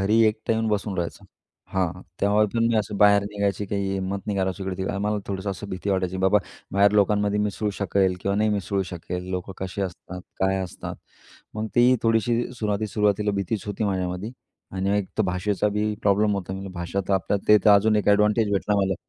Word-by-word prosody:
घरी 105 +4 +3
एकटा 110 +1 0
येऊन 110 0 0
बसून 105 -1 -1
राहायचो. 85 -2 -4 0.5
हां, 90 -1 -1 0.2
त्यामुळे 105 +1 +3
पण 115 0 +2
मी 115 - +1
असं 105 -1 -1
बाहेर 100 0 +5
निघायची 100 0 -1
काही 100 0 -2
हिम्मत 95 0 -2
नाही 105 -2 -1
करायचो, 95 0 -1
इकडे 95 +1 -3
मला 105 +1 0
थोडंसं 100 0 -3
असं 100 +1 -7
भीती 95 +2 -3
वाटायची, 95 -1 0
बाबा, 95 +2 +4 0.3
बाहेर 100 +1 +4
लोकांमध्ये 105 0 +2
मिसळू 105 0 -1
शकेल 95 -1 +1
किंवा 100 - 0
नाही 110 +1 +2
मिसळू 100 -1 -1
शकेल, 90 0 -6
लोकं 90 +1 -4
कशी 95 +1 -5
असतात, 90 0 -6 0.2
काय 95 0 +2
असतात, 90 - -7 0.6
मग 110 +1 -2
ती 125 +1 +5
थोडीशी 115 +1 +2 0.2
सुरुवाती 105 -1 -1
सुरुवातीला 105 0 +1
भीतीच 100 +2 -2
होती 105 +1 -2
माझ्यामध्ये. 95 +1 -2 0.4
आणि 95 +2 0
एक 100 - -2
तर - - +4
भाषेचा 95 +3 0
बी 105 0 0
प्रॉब्लेम 105 +1 +3
होता, 95 -1 -5
मी 95 +1 -6
भाषा 85 +2 -3
तर 100 - +1
आपल्या, 95 +1 0
ते 105 - +8
तर 105 - +7
अजून 105 +2 +5
एक 105 - +1
एडवांटेज 105 +1 +3
भेटला 105 +1 +1
मला, 95 -1 +1
100 Hz, 195 wpm, -24 LUFS, 95-105 Hz, 0.6 s, ते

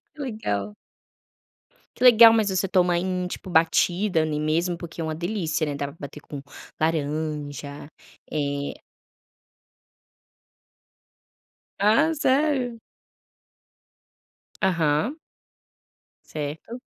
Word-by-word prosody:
Que - - -18
legal. 105 - -3 1.2
Que 250 - -3
legal, 230 -2 +9
mas 220 -2 +2
você 190 0 0
toma 180 -2 +2
em 180 0 -1
tipo, 185 - -8
batida 175 +2 +2
ali 155 -1 -1
mesmo 170 +3 0
porque 170 0 -8
é - - -1
uma 160 - -2
delícia, 170 -3 -1
né, 145 - -3
dá 140 0 -3
pra 145 - -11
bater 145 +1 -8
com 145 -1 -8 0.4
laranja, 150 -2 -2 0.4
eh 140 -1 -3 3.0
Ah, 250 +11 +4
sério? 265 -5 +1 1.8
Aham. 175 - +1 1.1
Certo. 155 - -6
170 Hz, 95 wpm, -24 LUFS, 150-215 Hz, 3.0 s, legal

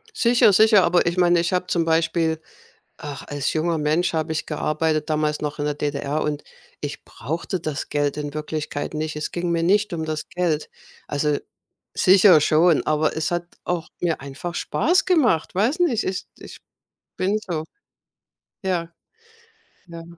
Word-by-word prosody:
Sicher, 235 - +4
sicher, 215 -1 +6
aber 175 0 +3
ich 170 +1 -1
meine, 175 -1 +4
ich 170 +2 0
habe 180 0 0
zum 170 -2 0
Beispiel 160 0 +1 0.6
ach, 145 -2 -7
als 145 -1 -2
junger 165 +1 0
Mensch 155 +4 +1
habe 160 0 -1
ich 160 0 -3
gearbeitet, 155 0 -1
damals 150 -1 0
noch 150 0 -3
in 145 - -2
der 150 - -1
DDR, 145 +1 -2
und 150 -1 -2 0.4
ich - - -6
brauchte 170 +4 -4
das 155 -3 -4
Geld 145 -1 0
in 145 -1 -4
Wirklichkeit 150 0 -4
nicht. 155 0 -3
Es 150 - -3
ging 175 0 -2
mir 165 -1 +1
nicht 205 +4 +2
um 160 -2 -2
das 155 -1 -4
Geld, 170 -4 -1 0.4
also 145 0 0 0.6
sicher 185 -3 +6
schon, 160 +2 +4
aber 155 0 +1
es 160 0 -1
hat 175 0 -1 0.2
auch 175 -2 -2
mir 170 -2 0
einfach 140 +6 -6
Spaß 355 - +1
gemacht. 250 - +2
Weiß 225 - +1
nicht, 265 -11 +2
ich 185 0 -3
ich - - -11 0.6
bin 200 +3 +1
so. 160 -3 -2 1.0
Ja. 170 -3 -2 0.9
Ja. 170 -1 -9
165 Hz, 165 wpm, -23 LUFS, 150-180 Hz, 1.0 s, sicher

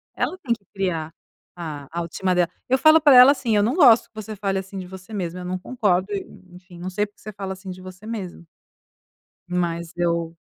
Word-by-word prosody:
Ela 370 - -2
tem 260 -10 -1
que 205 -4 -10
criar 180 -5 -2
a 155 -3 -10
a 170 - -2
autoestima 175 +2 -1
dela. 175 -1 +2 0.2
Eu 260 - +4
falo 310 +3 +6
para 290 -3 +7
ela 255 +2 +10
assim: 245 -6 0
"Eu - - +4
não 235 +7 +1
gosto 250 -10 +6
que - - -53
você 215 0 -6
fale 195 -1 -1
assim 190 +1 -5
de 180 - -7
você 190 +3 -11
mesma", 180 -3 -4
eu - - -7
não 185 +1 -3
concordo 190 -4 0
e 200 - -3 0.3
enfim, 180 -1 -14
não 180 +2 -4
sei 205 +3 0
porque 205 - -21
você 215 - -8
fala 195 -1 -5
assim 190 0 -10
de 185 0 -8
você 185 +2 -11
mesma. 200 -7 -6 1.1
Mas 170 -1 -2
eu, 170 -1 -1
190 Hz, 225 wpm, -23 LUFS, 175-215 Hz, 1.1 s, ela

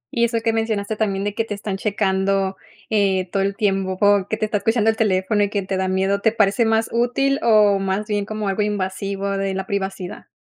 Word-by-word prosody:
Y 235 - +3
eso 230 -1 -1
que 225 - +1
mencionaste 220 -2 -1
también 200 -2 -1
de 205 0 -2
que 225 - -1
te 215 -2 -5
están 200 -1 -4
checando, 195 -1 0 0.4
eh, 195 -3 +2
todo 195 - 0
el 195 0 -1
tiempo 195 -2 0 0.3
que 220 - -1
te 215 - 0
está 215 -1 -1
escuchando 225 0 +2
el - - -6
teléfono 205 -1 +1
y 205 - +2
que 200 -1 -2
te 190 +1 -3
da 190 0 -1
miedo, 190 +2 0
¿te 225 - +3
parece 210 +1 +2
más 225 0 +2
útil, 260 +4 +1
o 210 -3 +4
más 195 +2 -1
bien 205 -1 -1
como 215 0 -4
algo 195 +2 0
invasivo 200 -1 -2
de 195 -1 -1
la 190 0 -3
privacidad? 190 -2 -4
200 Hz, 220 wpm, -21 LUFS, 195-220 Hz, 0.4 s, o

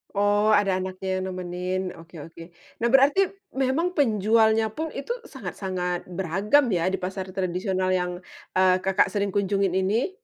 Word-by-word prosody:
Oh 205 +1 +2
ada 195 -2 +2
anaknya 185 0 -3
yang - - -3
nemenin, 180 0 -3 0.2
oke 165 +1 -15
oke. 165 0 -12 0.4
Nah 235 - +1
berarti 275 +7 +5 0.3
memang 270 +6 0
penjualnya 220 -3 +3
pun 320 +1 -2
itu 280 - -5 0.2
sangat-sangat 185 -6 -4
beragam 190 - +2
ya 175 0 +1
di 190 - +1
pasar 190 +1 -3
tradisional 185 0 -1
yang, 180 -1 0 0.4
eee, 185 0 +5
Kakak 195 0 +2
sering 200 0 -1
kunjungin 200 -2 +1
ini? 215 - 0
190 Hz, 145 wpm, -25 LUFS, 185-220 Hz, 0.4 s, berarti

